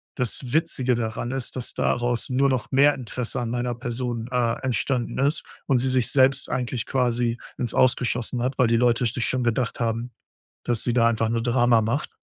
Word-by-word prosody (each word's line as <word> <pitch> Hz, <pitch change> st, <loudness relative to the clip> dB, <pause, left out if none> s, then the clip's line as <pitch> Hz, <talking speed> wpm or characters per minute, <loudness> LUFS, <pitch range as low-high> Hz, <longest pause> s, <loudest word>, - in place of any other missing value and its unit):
Das 125 Hz, 0 st, -3 dB
Witzige 135 Hz, -6 st, +1 dB
daran 115 Hz, +1 st, -3 dB
ist, 135 Hz, -2 st, -4 dB
dass 125 Hz, -2 st, -3 dB
daraus 120 Hz, -1 st, 0 dB
nur 135 Hz, +2 st, +2 dB
noch 130 Hz, -4 st, -1 dB
mehr 140 Hz, +2 st, +5 dB
Interesse 125 Hz, +1 st, -4 dB
an 115 Hz, -, -3 dB
meiner 120 Hz, 0 st, -2 dB
Person, 120 Hz, -1 st, -4 dB
äh, 120 Hz, -2 st, 0 dB
entstanden 130 Hz, -1 st, -1 dB
ist 145 Hz, +3 st, +1 dB, 0.2 s
und 135 Hz, -3 st, +3 dB
sie 130 Hz, -, 0 dB
sich 130 Hz, -2 st, +1 dB
selbst 135 Hz, 0 st, +3 dB
eigentlich 125 Hz, -2 st, -2 dB
quasi 120 Hz, -2 st, 0 dB, 0.2 s
ins 120 Hz, -3 st, -2 dB
Aus 130 Hz, -1 st, +4 dB
geschossen 120 Hz, 0 st, -2 dB
hat, 130 Hz, +1 st, -2 dB
weil 125 Hz, -, +5 dB
die 115 Hz, -, +2 dB
Leute 120 Hz, +1 st, +2 dB
sich 115 Hz, +1 st, -1 dB
schon 130 Hz, -1 st, 0 dB
gedacht 120 Hz, 0 st, -1 dB
haben, 115 Hz, +1 st, -2 dB, 0.5 s
dass 120 Hz, -3 st, 0 dB
sie 120 Hz, -, 0 dB
da 115 Hz, -1 st, +4 dB
einfach 115 Hz, -1 st, +1 dB
nur 115 Hz, 0 st, 0 dB
Drama 120 Hz, -1 st, +3 dB
macht. 115 Hz, +7 st, -1 dB
125 Hz, 195 wpm, -24 LUFS, 115-130 Hz, 0.5 s, mehr